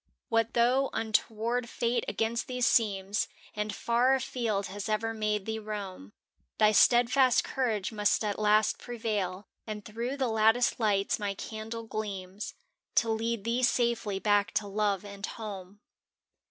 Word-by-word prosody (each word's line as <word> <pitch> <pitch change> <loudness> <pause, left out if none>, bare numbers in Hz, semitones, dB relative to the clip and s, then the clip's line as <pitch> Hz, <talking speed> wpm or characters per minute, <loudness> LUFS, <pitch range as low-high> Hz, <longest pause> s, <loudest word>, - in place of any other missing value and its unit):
What 225 0 +1
though 250 +3 +3
untoward 225 +2 0
Fate 235 0 0
against 230 +2 -1
thee 250 -1 -4
seems 205 -4 +2 0.3
And 210 0 -2
far 245 +5 +2
afield 235 -6 -1
has 205 +3 -5
ever 225 +1 0
made 210 -2 -1
thee 220 0 -3
roam? 200 - -7 0.4
Thy 215 - +5
steadfast 245 +3 +5
courage 225 -7 -1
must 210 0 +1
at 205 0 -2
last 215 0 +3
pre 245 -1 -7
vail, 205 -4 -2 0.2
And 210 -1 -6
through 235 +5 -4
the 265 -2 +1
lattice 225 +2 +3
lights 205 -3 +1
my 200 -1 -2
can 220 +2 -7
dle 230 0 -5
gleams 200 -3 -5 0.4
To 230 - +3
lead 225 -1 -1
thee 235 +3 0
safely 235 -5 +1
back 205 0 +2
to 210 - 0
love 205 -1 0
and 200 -1 -10
home. 205 -2 -7
220 Hz, 150 wpm, -29 LUFS, 205-235 Hz, 0.4 s, Thy